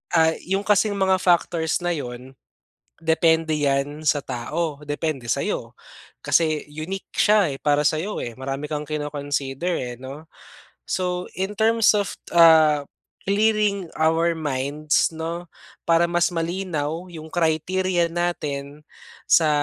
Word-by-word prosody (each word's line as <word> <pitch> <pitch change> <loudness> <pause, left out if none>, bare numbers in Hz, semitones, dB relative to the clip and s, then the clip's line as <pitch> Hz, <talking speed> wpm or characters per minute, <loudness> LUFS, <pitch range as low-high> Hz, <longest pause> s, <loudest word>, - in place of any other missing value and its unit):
ah, 160 -1 +5
yung 195 +3 -1
kasing 210 0 +3
mga 190 -1 +2
factors 170 -2 +2
na 175 - +1
'yon 125 -2 -7 0.7
depende 160 -1 +2
yan 145 +1 0
sa 150 -1 +2
tao. 140 +5 -3
Depende 145 -3 -3
sa'yo - - -2 0.5
kasi 155 -3 +2
unique 160 +6 -6
siya, 210 -5 +4
eh, 135 - -7
para 145 0 +3
sa'yo, 165 +7 -2
eh, 120 - -5
marami 135 +2 -4
kang 150 -1 -3
kino-consider, 145 +1 -3
eh, 125 -1 -5
'no. 140 +5 -10 0.6
So, 180 -1 -2
in 195 +2 -2
terms 225 0 +4
of, 200 - -1 0.2
ah, 155 -3 +6 0.4
clearing 205 -2 +1
our 165 +2 +3
minds 150 +2 0
'no, 165 +2 -5 0.4
para 170 +1 +4
mas 175 +1 +2
malinaw 170 -1 -3
'yong 160 -1 -9
criteria 175 +2 +1
natin 150 -5 -3 0.5
sa 160 -2 +5
160 Hz, 125 wpm, -23 LUFS, 145-175 Hz, 0.7 s, ah